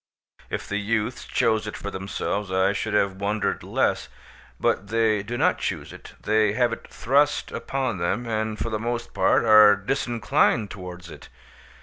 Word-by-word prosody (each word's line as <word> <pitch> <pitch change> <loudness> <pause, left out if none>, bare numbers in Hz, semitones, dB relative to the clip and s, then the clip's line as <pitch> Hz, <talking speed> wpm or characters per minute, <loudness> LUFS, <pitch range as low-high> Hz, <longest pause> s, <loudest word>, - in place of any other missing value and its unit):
If - - -4
the 100 - -2
youths 110 +3 -2
chose 110 -2 +1
it 105 - -5
for 100 - -6
themselves 100 0 -3
I 95 +1 +2
should 95 - -2
have 100 -2 +1
wondered 105 +1 -1
less; - - 0 0.5
but 100 - 0
they 110 -1 +1
do 115 +4 -5
not - - +2
choose - - -4
it; - - -12
they 110 -1 +2
have 120 +2 +1
it - - -8
thrust 145 +4 +1
upon 130 -8 -3
them, 85 +8 -1
and 110 -1 -2
for 115 - -3
the 110 - -1
most 115 +1 -4
part - - +3
are 105 -2 +8
disinclined 115 -1 0
towards 90 -2 -9
it. - - -12
110 Hz, 165 wpm, -24 LUFS, 100-115 Hz, 0.5 s, are